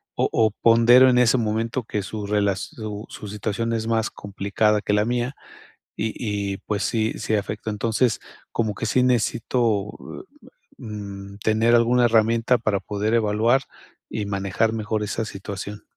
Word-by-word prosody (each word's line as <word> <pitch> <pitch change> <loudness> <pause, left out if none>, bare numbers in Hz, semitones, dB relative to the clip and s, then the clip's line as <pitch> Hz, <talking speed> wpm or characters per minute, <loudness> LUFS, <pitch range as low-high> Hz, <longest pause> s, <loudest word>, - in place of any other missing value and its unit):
o - - +1
o 110 -1 +3
pondero 120 +3 +7
en 125 - +3
ese 125 +1 +4
momento 115 +2 -1
que 105 -2 -3
su 105 +1 -5
relas 100 -2 +1
su 105 -1 -7
situación 105 +3 -2
es 110 -1 -2
más 115 0 +1
complicada 100 +1 0
que 105 - -1
la 105 0 +3
mía 120 +2 -1 0.6
y 110 0 -2 0.4
y, - - -5
pues 105 -2 -1
sí, 110 -1 0
sí 110 - 0
afecta. 105 +1 -3
Entonces, 110 +2 0 0.3
como 110 -3 -1
que - - -4
sí 125 - +2
necesito, 115 -3 +1 0.5
eh, - - -18 0.3
mm, 100 -3 -8
tener 110 +3 +3
alguna 120 +1 +4
herramienta 115 +1 +3
para 110 -3 0
poder 105 +3 -2
evaluar 115 +4 +2 0.5
y 105 - -3
manejar 100 +2 0
mejor 110 -1 -2
esa 110 +2 -2
situación. 100 0 -7
110 Hz, 155 wpm, -23 LUFS, 105-115 Hz, 0.6 s, pondero